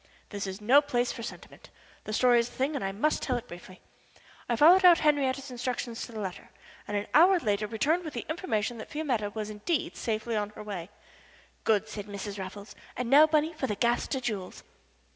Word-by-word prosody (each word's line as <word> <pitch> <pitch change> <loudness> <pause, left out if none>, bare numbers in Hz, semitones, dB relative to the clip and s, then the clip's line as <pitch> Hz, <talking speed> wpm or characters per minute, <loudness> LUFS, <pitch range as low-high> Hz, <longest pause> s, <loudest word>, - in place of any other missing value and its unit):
This 200 -2 -4
is 190 +1 -6
no 250 +7 +5
place 245 -4 0
for 235 - -7
sentiment. 230 - -10 0.4
The - - -5
story 245 +1 +4
is 235 +1 -1
the - - -17
thing, 275 +4 -1
and 280 - -3
I 195 - -1
must 235 +11 0
tell 255 -3 -1
it 240 +1 -8
briefly. 175 +1 -12 0.7
I 240 - +2
followed 345 +9 +7
out 350 -2 +8
Henriette's 275 -3 +1
instructions 245 -1 -4
to - - -13
the 220 - -7
letter, 190 -3 -6 0.4
and 205 - -2
an 205 - -2
hour 360 +5 +7
later 210 -5 -1
returned 290 +11 0
with 310 -3 -7
the - - -4
information 240 - -2
that - - -8
Fiametta 255 -9 -1
was, 215 -1 -4
indeed, 270 +10 -2
safely 225 0 -2
on 210 -1 -1
her - - -8
way. 190 -4 -6 0.8
"Good," 220 -1 +2
said 210 -1 -7
Mrs. 200 0 -6
Raffles. 200 +2 -8 0.2
"And 250 0 -3
now, 300 +3 +8
Bunny, 310 +1 +1
for 280 -4 -3
the 210 - -2
Gaster 240 +4 0
jewels." 210 -7 -5
235 Hz, 205 wpm, -28 LUFS, 210-285 Hz, 0.8 s, out